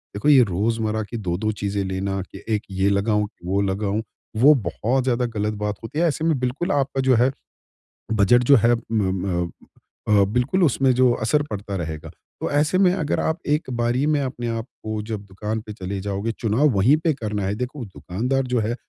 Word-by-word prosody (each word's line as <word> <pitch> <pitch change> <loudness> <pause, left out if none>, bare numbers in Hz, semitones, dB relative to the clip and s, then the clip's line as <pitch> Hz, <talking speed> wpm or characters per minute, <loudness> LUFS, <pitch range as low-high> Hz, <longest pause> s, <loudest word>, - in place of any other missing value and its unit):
देखो 105 +9 +1
ये 135 -4 +7
रोज़मर्रा 110 +2 -1
की 120 - -4
2-2 100 +1 -1
चीजें 100 -1 -2
लेना 95 +1 -2
कि - - -11
1 105 - -3
ये 95 +1 +1
लगाऊँ 105 +1 +1
कि 90 -5 -15
वो 100 +2 +1
लगाऊँ। 100 +2 -1 0.4
वो 145 +4 +8
बहुत 130 +4 0
ज़्यादा 125 -1 +1
गलत 105 -2 -2
बात 105 0 -1
होती 130 +7 -4
है। 170 - +3
ऐसे 160 0 -1
में 160 -3 +2
बिल्कुल 125 +7 -1
आपका 135 -1 0
जो 130 -1 +4
है 125 +3 +3 0.8
बजट 110 +3 +4
जो - - +10
है 120 +1 +5 0.2
म 105 -4 +1 0.2
म 85 -2 -1 0.6
अ, - - 0
बिल्कुल 125 - +1
उसमें 135 -3 +3
जो 125 0 +4
असर 130 +7 +2
पड़ता 100 -1 -5
रहेगा। 80 -4 -5 0.3
तो - - -1
ऐसे 150 +5 +2
में, 185 -2 +5
अगर 165 -6 -1
आप 160 - 0
एक 150 -1 0
बारी 120 +3 +1
में 150 -1 +2
अपने 125 -3 -4
आपको 110 -2 -6
जब 110 -1 -5
दुकान 105 +3 -4
पे 105 0 -9
चले 95 -1 -5
जाओगे, 100 +3 -2
चुनाव 115 +6 +1
वहीं 115 +4 +4
पे 160 - +3
करना 105 -6 -3
है। 100 +2 -1
देखो, 125 +4 -5
दुकानदार 115 +7 -2
जो 125 -1 +1
है 110 +2 -1
110 Hz, 200 wpm, -23 LUFS, 100-130 Hz, 0.8 s, जो